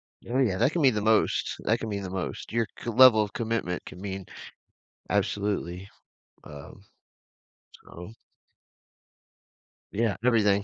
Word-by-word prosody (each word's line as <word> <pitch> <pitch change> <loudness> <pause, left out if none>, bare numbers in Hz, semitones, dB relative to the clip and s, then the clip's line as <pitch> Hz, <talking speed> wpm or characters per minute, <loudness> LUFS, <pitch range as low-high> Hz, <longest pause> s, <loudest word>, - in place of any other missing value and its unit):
Oh, 120 +2 -6
yeah, 110 -9 +1
that 120 +7 +2
can 170 - 0
mean 130 -4 +5
the 105 - -1
most, 110 +1 +1
that 115 +2 +1
can 115 - -4
mean 100 -2 -3
the 95 - -6
most. 95 +2 -5
Your 115 0 +1
co 120 - -5
level 125 -2 +7
of 105 -2 -4
commitment 115 -6 -3
can 90 - -11
mean 95 -1 -6 0.8
absolutely, 100 -3 -2 0.6
um, 75 +6 -11 1.1
so 90 +6 -11 1.8
Yeah, 110 -1 0
everything. 105 -5 +3
105 Hz, 135 wpm, -27 LUFS, 95-115 Hz, 1.8 s, level